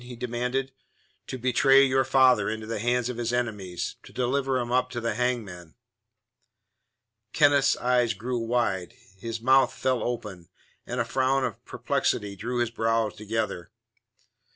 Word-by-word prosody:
he 125 0 -9
demanded. 125 +3 -3 0.5
"To 130 - -5
betray 135 +2 +4
your 130 0 +2
father 130 -5 +4
into 110 0 -4
the 110 -1 -4
hands 120 +2 +1
of 125 -2 -5
his 120 -1 -2
enemies; 105 -7 -3
to - - -15
deliver 130 +1 0
him 120 -1 -3
up 125 0 +2
to 125 -1 -4
the 115 -1 -1
hangman." 105 -9 -3 1.6
Kenneth's 145 -1 +4
eyes 120 -3 +1
grew 120 +4 -3
wide; 115 -4 -1 0.2
his 115 +2 -5
mouth 130 +1 +4
fell 130 -2 -1
open, 100 -8 -5 0.4
and 125 - -3
a 115 - +1
frown 130 +2 +1
of 115 -5 -6
perplexity 100 -1 -1
drew 120 +5 -4
his 120 -1 -1
brows 115 -2 0
together. 105 -5 -3
120 Hz, 150 wpm, -26 LUFS, 110-125 Hz, 1.6 s, betray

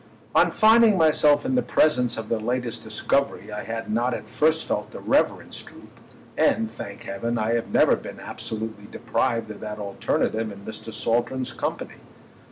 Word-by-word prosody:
On - - +5
finding 220 -1 +5
myself 150 - +4
in 260 - 0
the 250 - +3
presence 125 - +2
of 110 -1 -5
their 115 - 0
latest 120 0 -2
discovery 110 0 -1
I 105 0 -5
had 115 0 -5
not 120 +3 +1
at - - -8
first 160 +1 +1
felt - - -3
irreverence - - 0
droop—and, 110 0 -3
thank 100 -2 -8
heaven, 115 +5 -3
I 110 +1 0
have 115 -1 0
never - - +4
been - - -9
absolutely 110 -2 -6
deprived 115 0 -1
of 105 - -9
that 105 -1 -6
alternative 105 +2 -1
in 100 0 -11
Mr. 110 +1 -7
Saltram's 120 +4 -1
company. - - -4
115 Hz, 160 wpm, -24 LUFS, 110-130 Hz, -, On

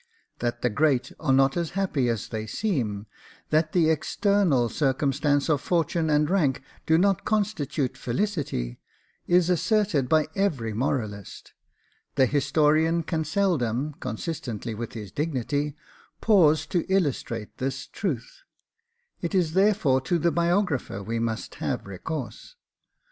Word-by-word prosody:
That 120 0 -2
the 125 - +2
great 140 +1 +1
are 150 -4 0
not 135 0 +4
as 170 -2 -1
happy 150 -11 +1
as 115 -3 -2
they 110 -1 -4
seem, 110 - -2 0.5
that 155 0 +2
the 165 -3 +3
external 170 - +2
circumstances 140 +2 +1
of 150 -4 +2
fortune 165 -1 0
and 150 0 +3
rank 150 -8 +1 0.2
do 160 - +5
not 195 +1 +2
constitute 160 - -1
felicity, 125 - -2 0.5
is 175 -1 +4
asserted 180 - +1
by 155 -1 +4
every 140 - 0
moralist: 110 -4 -3 0.6
the 130 - +5
historian 150 +4 +2
can 160 0 -1
seldom, 150 - 0
consistently 120 - -4
with 115 +1 -6
his 105 -5 -7
dignity, 145 - -2 0.4
pause 160 -9 +4
to 175 - 0
illustrate 135 - -1
this 135 0 -3
truth; 155 - -4 0.8
it 170 +3 -2
is 170 -4 +2
therefore 190 -9 +3
to 130 +7 0
the 170 +1 +2
biographer 170 - 0
we 115 +3 -2
must 115 -1 -3
have - - -2
recourse. 155 - -6
150 Hz, 130 wpm, -26 LUFS, 125-170 Hz, 0.8 s, do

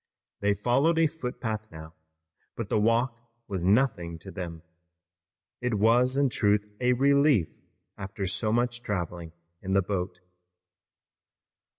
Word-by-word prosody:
They 100 0 +2
followed 130 - +2
a 165 - +5
footpath 125 -8 -4
now, 80 0 -10 0.6
but - - -5
the - - +2
walk 115 +3 +2 0.3
was 95 -4 -3
nothing 95 -5 +2
to 95 +4 -10
them. 85 -2 -7 1.0
It 125 -2 0
was 120 +5 +3
in 140 -1 +3
truth 105 -2 +2
a 125 0 +3
relief 140 - +3 0.5
after 95 0 -4
so 95 +4 0
much 120 +1 0
traveling 85 -5 -4 0.3
in 95 - -3
the 95 0 +4
boat. 90 -1 -3
105 Hz, 125 wpm, -27 LUFS, 95-125 Hz, 1.0 s, a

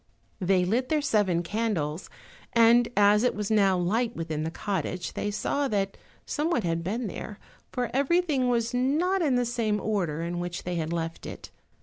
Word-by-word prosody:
They 185 -1 +2
lit 240 +7 0
their 310 - +2
seven 195 - +2
candles, 185 -6 -2 0.4
and 235 +1 +5
as 205 +1 +5
it 250 - +2
was 210 0 -3
now 195 -3 +4
light 225 +7 0
within 160 -2 -3
the 160 - -2
cottage 185 0 -3
they 205 - -2
saw 280 +7 -1
that 195 -4 -1 0.3
someone 300 -5 0
had 165 -1 -1
been 225 +7 -2
there, 205 +1 -6 0.3
for 245 -2 -2
everything 280 -1 +2
was 235 0 0
not 310 +10 +1
in 285 -6 +2
the 245 0 +2
same 225 -3 0
order 180 -7 -1
in 175 +1 -3
which 175 0 -4
they 180 - -3
had 165 -2 -2
left 165 -1 -4
it. - - -9
210 Hz, 180 wpm, -27 LUFS, 175-245 Hz, 0.4 s, and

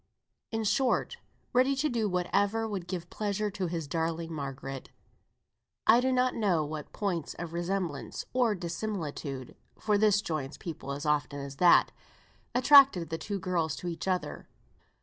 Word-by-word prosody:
In 225 0 -2
short, 260 - +1 0.4
ready 260 +2 +4
to 285 +3 +1
do 230 -6 0
whatever 205 +5 +1
would 195 -5 -4
give 175 -2 -5
pleasure 210 0 -2
to 195 -2 -2
his 165 -3 -3
darling 165 +1 -2
Margaret. 135 -2 -6 1.0
I 235 +2 +6
do 260 +1 +1
not 255 0 +2
know 180 -8 +1
what 150 0 -6
points 180 -7 -3
of 170 -1 -6
resemblance 175 -3 -3
(or 240 -4 +2
dissimilitude, 170 - -5 0.2
for 210 -1 +1
the 215 - +5
one 205 0 +3
joins 155 -4 -3
people 155 -5 -6
as 145 +2 -5
often 145 -1 0
as 140 0 -7
the 180 - +2
other) 175 - +6 0.6
attracted 260 - +6
the 160 - -2
two 205 -1 -3
girls 170 -5 -1
to 180 - -6
each 170 +2 -4
other. 185 -1 -2
180 Hz, 160 wpm, -30 LUFS, 160-215 Hz, 1.0 s, I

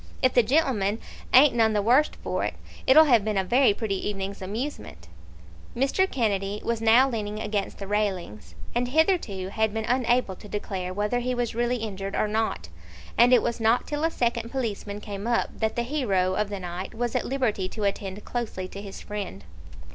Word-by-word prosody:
"If 255 - +4
the 245 - +6
gen'leman 230 -6 +1 0.3
ain't 270 +2 +7
none 225 -2 +3
the 210 - +2
worst 255 +7 +3
for - - -1
it, - - -2 0.3
it'll 300 +5 +8
have 240 -8 +4
been 215 -1 -1
a 190 - +2
very 245 +6 +4
pretty 200 -2 -2
evening's 195 0 -5
amusement." 190 - -5 0.7
Mr. 275 +10 +2
Kennedy 205 -4 -1
was 235 -1 -1
now 230 +4 +6
leaning 215 -4 -3
against 210 -2 -2
the 200 - -6
railings, 180 - -2 0.2
and 245 +1 0
hitherto 260 - +1
had 220 +1 0
been 220 0 -2
unable 245 -4 +1
to 210 - -12
declare 190 -3 -4
whether 210 +5 0
he 250 +1 -1
was 245 -2 -1
really 240 +2 0
injured 195 -3 -5
or - - +1
not, 210 - -1 0.5
and 240 +2 +5
it 250 - +6
was 235 0 -2
not 225 +2 +2
till 295 +1 -3
a 325 - +3
second 235 -5 -1
policeman 210 -5 -4
came 205 +1 -6
up 235 -1 +1
that 220 -1 0
the 240 - 0
hero 205 -9 0
of 210 +1 -1
the 200 -1 -4
night 180 +3 -6
was 240 0 -2
at - - +1
liberty 225 -8 -1
to 215 - -5
attend 200 0 -3
closely 220 -6 -4
to 200 - -8
his 195 -1 -9
friend. 200 - -6
220 Hz, 195 wpm, -26 LUFS, 195-245 Hz, 0.7 s, it'll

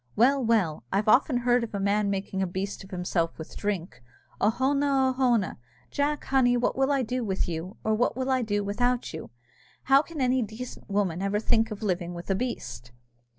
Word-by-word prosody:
Well, 265 +4 +4
well, 210 -10 +1
I've 200 +2 0
often 250 +4 +4
heard 245 0 +2
of 220 -3 -5
a - - -1
man 200 +1 +1
making 195 -1 -2
a 190 - +1
beast 190 +3 -4
of 190 - -13
himself 180 -3 -1
with 160 - -9
drink! 200 - -3 0.4
Oh 210 - +5
hone, 265 +5 +1
oh 270 -2 +2
hone! 245 -7 +1 0.3
Jack, 290 +1 0
honey, 245 -2 +3
what 245 - 0
will 270 +1 +2
I 275 -2 +2
do 250 +2 -2
with 195 -3 -1
you, 170 +3 -5
or 220 - +1
what 240 +3 +1
will 260 0 -1
I 260 -1 +2
do 205 -3 -1
without 245 +4 0
you? 160 - -7 0.5
How 270 +1 +5
can 315 0 -9
any 255 0 +2
decent 225 +2 -7
woman 195 -4 0
ever 200 +1 0
think 225 0 +2
of 215 0 -7
living 175 -3 -1
with 170 +3 -5
a - - +2
beast?" 125 - -5
220 Hz, 205 wpm, -27 LUFS, 195-255 Hz, 0.5 s, Oh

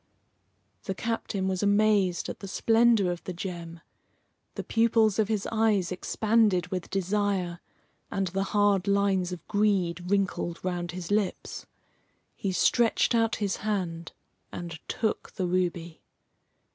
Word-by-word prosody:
The 190 - -3
captain 220 -4 -2
was 185 -1 -1
amazed 205 -3 +2
at - - -6
the 195 - -7
splendour 225 -2 +3
of 175 - -6
the 185 - -4
gem. 170 -2 -6 0.7
The - - -4
pupils 225 -2 +2
of 215 - +3
his 210 -2 -1
eyes 215 -5 +2
expanded 205 -1 +1
with 180 -2 -4
desire, 195 -2 -1 0.5
and 195 - -1
the 195 +2 -1
hard 205 -1 +2
lines 200 -2 +2
of 180 - -8
greed 185 -4 +1
wrinkled 190 -4 0
around 175 -2 -2
his 180 0 -6
lips. 205 -2 -2 0.7
He 195 - -2
stretched 230 +7 +3
out 225 -1 +2
his 200 -3 -1
hand 180 -6 -3 0.4
and 170 -2 -6
took 220 -2 -2
the 185 - -2
ruby. 175 -2 -2
195 Hz, 135 wpm, -27 LUFS, 180-210 Hz, 0.7 s, splendour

